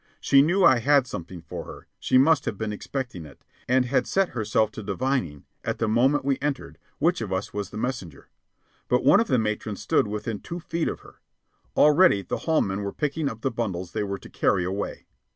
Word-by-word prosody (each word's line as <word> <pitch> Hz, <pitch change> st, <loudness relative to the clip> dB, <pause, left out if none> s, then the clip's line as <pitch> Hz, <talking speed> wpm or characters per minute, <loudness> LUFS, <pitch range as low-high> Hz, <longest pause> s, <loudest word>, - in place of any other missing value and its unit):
She 135 Hz, -, +5 dB
knew 180 Hz, +7 st, +2 dB
I 125 Hz, -, +6 dB
had 140 Hz, +2 st, +4 dB
something 90 Hz, -7 st, -8 dB
for -, -, -7 dB
her; -, -, -11 dB
she -, -, +2 dB
must 140 Hz, +1 st, +4 dB
have 100 Hz, -, -3 dB
been 110 Hz, 0 st, -3 dB
expecting 120 Hz, -5 st, -5 dB
it, 70 Hz, -4 st, -15 dB, 0.2 s
and 125 Hz, 0 st, +3 dB
had 130 Hz, +2 st, 0 dB
set 195 Hz, -1 st, +1 dB
herself 110 Hz, -2 st, 0 dB
to 110 Hz, -, -8 dB
divining, 105 Hz, -, -2 dB, 0.2 s
at -, -, -2 dB
the 115 Hz, -, 0 dB
moment 130 Hz, +6 st, +2 dB
we 140 Hz, -1 st, +1 dB
entered, 145 Hz, -2 st, -3 dB, 0.2 s
which 170 Hz, +1 st, +1 dB
of 105 Hz, -4 st, -4 dB
us 95 Hz, +1 st, -3 dB
was 105 Hz, -1 st, -4 dB
the 105 Hz, -, -8 dB
messenger. 115 Hz, -, -5 dB, 0.6 s
But 125 Hz, -, +2 dB
one 170 Hz, +9 st, +7 dB
of 230 Hz, -, +1 dB
the 130 Hz, -, +2 dB
matrons 105 Hz, -2 st, -2 dB
stood 105 Hz, -, +2 dB
within 105 Hz, 0 st, -4 dB
two 170 Hz, -, -7 dB
feet 165 Hz, 0 st, -2 dB
of -, -, -4 dB
her. -, -, -18 dB, 0.6 s
Already 150 Hz, -, +5 dB
the -, -, -3 dB
hall 160 Hz, -, +4 dB
men 95 Hz, +1 st, -2 dB
were 100 Hz, -1 st, -3 dB
picking 150 Hz, 0 st, -1 dB
up 110 Hz, -3 st, -9 dB
the 135 Hz, -, 0 dB
bundles 95 Hz, -7 st, -3 dB
they 110 Hz, -, -2 dB
were 100 Hz, -1 st, -3 dB
to -, -, -13 dB
carry 95 Hz, -3 st, +1 dB
away. 95 Hz, +3 st, -4 dB
115 Hz, 215 wpm, -25 LUFS, 100-140 Hz, 0.6 s, one